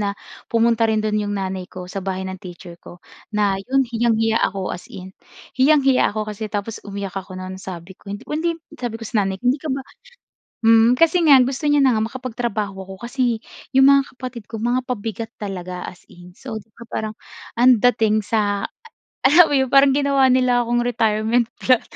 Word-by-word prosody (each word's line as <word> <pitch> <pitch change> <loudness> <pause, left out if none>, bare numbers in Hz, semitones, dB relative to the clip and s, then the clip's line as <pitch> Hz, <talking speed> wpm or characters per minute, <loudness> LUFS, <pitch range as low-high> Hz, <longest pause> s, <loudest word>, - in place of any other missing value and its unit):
na 200 -1 -2 0.3
pumunta 230 0 +2
rin 215 -1 +1
do'n 215 0 0
'yong 205 0 -2
nanay 190 -1 -4
ko 185 -1 -8
sa 190 +2 -6
bahay 190 0 -3
ng 190 -1 -6
teacher 175 -1 -11
ko. 175 - -12 0.4
Na, 200 -2 +1
'yon, 265 +5 +1
hiyang-hiya 225 -1 +1
ako, 195 -1 -1
as 180 - -8
in 185 +1 -10 0.4
hiyang-hiya 270 -1 +4
ako. 215 0 -3
Kasi, 215 +1 -6
tapos 205 +1 -4
umiyak 200 -2 -6
ako 190 -1 -7
non, 185 0 -7
sabi 180 -1 -8
ko 195 - -17
hindi 305 +11 -3 0.2
sabi 240 -3 -3
ko 225 - -9
sa 220 -1 0
nanay 190 -1 -1
ko, - - -26
hindi 275 - -6
ka 315 - -6
ba 265 -1 -2 0.8
hmm. 230 +2 +5
Kasi 330 +2 +4
nga 290 -4 +7
gusto 275 +3 -2
niya 290 -2 +4
na 255 - +4
nga 215 - +1
makapagtrabaho 225 -4 -3 0.2
ako, - - -6
kasi 245 -2 0 0.3
'yong 265 0 +5
mga 275 0 +4
kapatid 255 -3 -7
ko 225 - -5
mga 240 +3 0
pabigat 225 -1 -4
talaga, 185 -3 -6
as 180 - -10
in. 175 0 -15
So, 225 +1 -7
di 210 - -11
ba 235 - -12
parang, 215 0 -3 0.4
ang 245 +1 +5
dating 215 -2 +2
sa 205 -2 0 0.6
alam 315 +3 +6
mo - - +1
'yon, 265 - +1
parang 275 +1 +6
ginawa 275 -1 +3
nila 250 -1 +3
akong 240 +1 0
retirement 230 0 +1
plan, 255 -3 +3
225 Hz, 195 wpm, -21 LUFS, 200-255 Hz, 0.8 s, nga